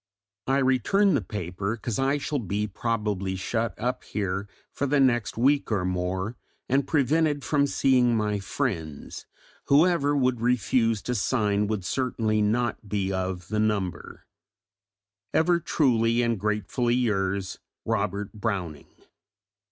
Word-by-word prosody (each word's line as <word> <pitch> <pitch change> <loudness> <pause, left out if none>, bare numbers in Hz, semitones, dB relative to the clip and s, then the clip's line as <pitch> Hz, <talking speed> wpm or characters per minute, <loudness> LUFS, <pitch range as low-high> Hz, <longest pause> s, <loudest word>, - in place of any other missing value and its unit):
I 135 +1 +2
return 140 - +3
the 135 - +2
paper, 100 +2 -4
because 115 0 -4
I 135 +2 +2
shall 145 0 -2
be 105 -1 -2
probably 105 -3 -2
shut 110 +4 -2
up 125 +2 -2
here 100 -1 -3 0.2
for 140 - -2
the 145 +1 +2
next 120 -6 +2
week 140 +2 +2
or 100 -4 +1
more, 90 +4 -2 0.3
and 135 +1 +1
prevented 150 0 +2
from 145 -2 +2
seeing 125 -4 +3
my 105 -1 0
friends: 95 - -4 0.4
whoever 145 -1 +3
would 125 -3 +1
refuse 115 -2 +1
to 125 - -2
sign 105 -2 +1
would 105 -3 -3
certainly 110 -3 0
not 110 0 0
be 95 -1 -1
of 95 -1 -3
the 110 0 -1
number. 105 -4 -2 1.1
Ever 170 +2 +3
truly 120 -7 +2
and 115 -3 0
gratefully 105 +4 0
yours, 100 -5 -1 0.3
ROBERT 105 -2 -2
BROWNING. 95 -9 -3
110 Hz, 130 wpm, -26 LUFS, 100-130 Hz, 1.1 s, return